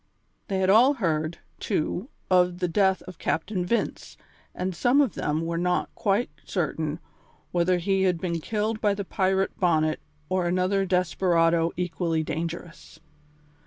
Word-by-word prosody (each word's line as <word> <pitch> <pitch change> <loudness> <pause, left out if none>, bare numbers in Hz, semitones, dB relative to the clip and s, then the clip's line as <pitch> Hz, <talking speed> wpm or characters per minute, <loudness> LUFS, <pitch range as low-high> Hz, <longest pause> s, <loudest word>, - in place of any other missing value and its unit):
They 195 - -1
had 190 0 +4
all 250 +7 +6
heard, 160 - -1 0.2
too, 185 - -2 0.2
of 180 -1 +4
the 180 0 0
death 190 +2 +2
of 185 - -11
Captain 180 +2 -1
Vince, 230 +7 -2 0.4
and 185 +1 -2
some 245 - +3
of 275 -9 +3
them 150 +2 -1
were 170 0 -2
not 180 0 0
quite 205 +4 0
certain 155 -4 -2 0.5
whether 180 +1 +2
he 195 +2 +1
had 180 -3 +2
been 170 -1 -2
killed 215 +5 -2
by 205 -2 +2
the 200 -1 -4
pirate 190 0 0
Bonnet 155 -4 +2 0.3
or 185 -2 0
another 185 +2 +1
desperado 170 -2 +2
equally 170 -2 -1
dangerous. 165 +2 -6
180 Hz, 145 wpm, -26 LUFS, 170-195 Hz, 0.5 s, all